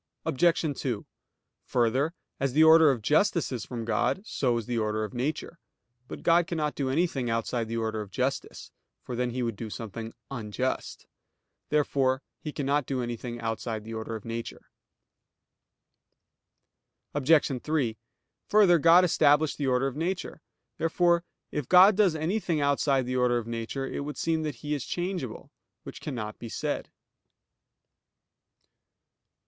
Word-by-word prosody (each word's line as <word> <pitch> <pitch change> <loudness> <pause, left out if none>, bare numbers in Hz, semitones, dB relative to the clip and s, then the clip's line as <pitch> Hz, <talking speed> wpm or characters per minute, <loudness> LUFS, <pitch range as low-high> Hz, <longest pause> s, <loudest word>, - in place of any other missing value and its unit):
Obj. 160 0 +1
2: 120 -6 -2 0.6
Further, 130 +7 +1 0.2
as 135 -2 0
the 155 +3 +6
order 160 -1 +8
of 125 -6 0
justice 165 - +2
is 125 -3 -4
from 120 -3 -5
God, 120 - 0
so 125 - 0
is 115 - -4
the 120 0 -1
order 110 0 -1
of 110 - -5
nature. 150 +6 -3 0.5
But - - -8
God 170 0 +4
cannot 155 -3 -1
do 135 -2 -2
anything 135 -4 0
outside 115 0 -1
the 115 +1 -3
order 110 -1 -2
of 105 - -8
justice; 130 +6 -3 0.3
for 125 - -5
then 125 +1 0
He 125 +1 -2
would 115 -2 -2
do 110 +2 -6
something 110 +1 -7 0.2
unjust. 125 +1 -3 0.6
Therefore 135 -3 +1 0.2
He 150 - -5
cannot 145 -1 0
do 130 -2 -1
anything 120 0 -5
outside 115 -1 -3
the 115 +1 -8
order 110 0 -4
of 110 - -8
nature. 115 0 -6 2.4
Obj. 145 -2 +3
3: 140 -8 -1 0.5
Further, 195 -5 +5
God 170 +4 +7
established 150 -3 +3
the 140 - 0
order 125 +1 +2
of 135 -1 -2
nature. 170 0 -3 0.4
Therefore 170 +1 +2 0.3
it 150 -4 -3
God 185 +3 +8
does 195 -5 +3
anything 165 +1 -1
outside 140 -2 +2
the 130 +1 -2
order 125 -1 +3
of 120 - -3
nature, 115 +4 -4
it - - -4
would 145 +1 -5
seem 165 -1 0
that 150 -4 -3
He 150 - -1
is 145 -4 -2
changeable; 175 - -4 0.3
which - - -9
cannot 110 -7 -5
be 115 - -7
said. - - -3
135 Hz, 150 wpm, -28 LUFS, 115-155 Hz, 2.4 s, order